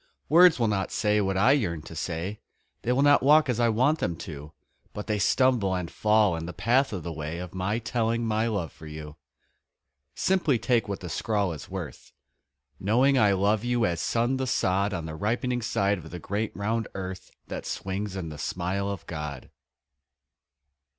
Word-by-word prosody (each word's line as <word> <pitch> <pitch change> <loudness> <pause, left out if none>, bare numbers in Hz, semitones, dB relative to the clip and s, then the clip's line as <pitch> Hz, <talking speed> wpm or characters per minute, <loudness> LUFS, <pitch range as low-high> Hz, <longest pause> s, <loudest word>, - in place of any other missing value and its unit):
Words 175 +2 +7
will 115 -2 +2
not 100 -2 -1
say 105 -1 +2
what 95 -1 0
I 110 +8 +5
yearn 85 - 0
to - - -10
say 90 +6 -4 0.4
They 120 - -1
will 130 +3 +3
not 145 0 +6
walk 150 +3 +5
as 120 -2 0
I 120 -1 +4
want 130 +8 +2
them 85 - -1
to, 75 -2 -8 0.4
But 105 - -5
they 105 -2 -1
stumble 115 -3 +2
and 90 -2 -4
fall 105 -4 +3
in 80 0 -5
the 90 - -6
path 130 +4 +2
of 95 -6 -4
the 85 - -4
way 80 +1 -5
Of 90 0 -7
my 95 +4 -1
telling 115 0 -1
my 110 0 +1
love 100 -7 -2
for 80 - -12
you. 75 -1 -8 1.0
Simply 175 -9 +2
take 115 0 +1
what 100 - -4
the 90 - -6
scrawl 100 +3 0
is 75 - -9
worth 90 -8 -7 0.7
Knowing 125 +7 +3
I 105 -3 +5
love 100 +3 +2
you 120 -1 +1
as 85 -3 -1
sun 120 +3 +1
the 130 0 -2
sod 100 -3 +1
On 85 -4 -3
the 80 - -6
ripening 120 +8 -1
side 100 -3 0
of 80 -1 -11
the 90 - -7
great 100 +5 -3
round 110 +2 -1
earth 95 -1 -6 0.2
That - - -6
swings 95 +1 -4
in 90 -4 -4
the 75 -1 -9
smile 95 +5 -2
of 100 -4 -5
God. 75 -5 -6
100 Hz, 190 wpm, -27 LUFS, 90-120 Hz, 1.0 s, Words